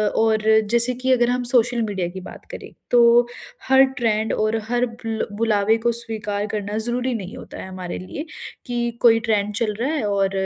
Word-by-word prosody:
और 220 Hz, -1 st, +2 dB, 0.3 s
जैसे 235 Hz, +1 st, +3 dB
कि 255 Hz, +1 st, -1 dB
अगर 240 Hz, -1 st, +2 dB
हम 250 Hz, 0 st, 0 dB
सोशल 245 Hz, -1 st, +2 dB
मीडिया 195 Hz, -5 st, -2 dB
की 190 Hz, +2 st, -8 dB
बात -, -, -11 dB
करें -, -, -8 dB, 0.2 s
तो 240 Hz, 0 st, +6 dB, 0.4 s
हर 265 Hz, 0 st, +7 dB, 0.2 s
ट्रेंड 220 Hz, -2 st, 0 dB
और 215 Hz, +1 st, 0 dB
हर 245 Hz, 0 st, +2 dB
बुल 230 Hz, -2 st, -4 dB
बुलावे 220 Hz, -1 st, +2 dB
को 235 Hz, -, +4 dB
स्वीकार 215 Hz, -3 st, -3 dB
करना 210 Hz, 0 st, -3 dB
ज़रूरी 245 Hz, +3 st, -1 dB
नहीं 205 Hz, +2 st, -6 dB
होता -, -, -10 dB
है -, -, -8 dB
हमारे 185 Hz, -2 st, -6 dB
लिए। 285 Hz, -, -7 dB, 0.4 s
कि 240 Hz, -1 st, -2 dB
कोई 225 Hz, -1 st, +6 dB
ट्रेंड 210 Hz, -1 st, +1 dB
चल 215 Hz, -1 st, 0 dB
रहा 255 Hz, +4 st, 0 dB
है 300 Hz, -, -1 dB
और 195 Hz, -1 st, +1 dB
225 Hz, 190 wpm, -22 LUFS, 210-240 Hz, 0.4 s, हर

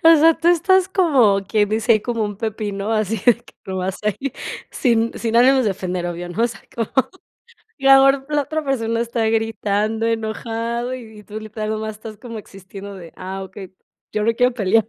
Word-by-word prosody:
O 330 Hz, 0 st, +9 dB
sea, 325 Hz, +2 st, +6 dB
tú 340 Hz, -, +1 dB
estás 365 Hz, +2 st, +4 dB
como 255 Hz, -, +3 dB
quien 210 Hz, -1 st, +2 dB
dice: 225 Hz, +2 st, +2 dB
"Ahí 215 Hz, -, +3 dB
como 230 Hz, -3 st, -1 dB
un 205 Hz, -1 st, -4 dB
pepino", 210 Hz, -1 st, -3 dB
así 215 Hz, 0 st, 0 dB
de 245 Hz, -, +7 dB
que -, -, -18 dB
nomás 190 Hz, 0 st, -3 dB
ahí, 260 Hz, +6 st, -1 dB, 0.4 s
sin 230 Hz, -3 st, +1 dB
sin 230 Hz, 0 st, 0 dB
ánimos 260 Hz, +1 st, +5 dB
de 205 Hz, -, +2 dB
ofender, 180 Hz, -2 st, -3 dB
obvio, 175 Hz, 0 st, -5 dB
¿no?, 200 Hz, +7 st, -2 dB
o -, -, +5 dB
sea, 225 Hz, -4 st, -9 dB
como, 230 Hz, -2 st, -2 dB, 0.9 s
y 270 Hz, -, -10 dB
la 270 Hz, 0 st, +8 dB
or 270 Hz, 0 st, +3 dB
la 295 Hz, -1 st, +1 dB
otra 310 Hz, +2 st, -3 dB
persona 230 Hz, -4 st, 0 dB
está 235 Hz, -1 st, -1 dB
gritando, 220 Hz, 0 st, 0 dB
enojado, 230 Hz, +2 st, -2 dB
y 220 Hz, -4 st, -10 dB
y -, -, -17 dB
tú 215 Hz, +1 st, -7 dB
literal 215 Hz, 0 st, -5 dB
nada 215 Hz, 0 st, -2 dB
más 220 Hz, 0 st, -3 dB
estás 215 Hz, 0 st, -9 dB
como 230 Hz, 0 st, -8 dB
existiendo 195 Hz, 0 st, -10 dB
de: 170 Hz, -3 st, -11 dB
"Ah, 190 Hz, +1 st, -5 dB
okey, 190 Hz, -1 st, -10 dB, 0.4 s
yo 210 Hz, -, 0 dB
no 230 Hz, -, +3 dB
quiero 250 Hz, +1 st, +3 dB
pelear". 220 Hz, 0 st, +2 dB
225 Hz, 205 wpm, -21 LUFS, 205-245 Hz, 0.9 s, O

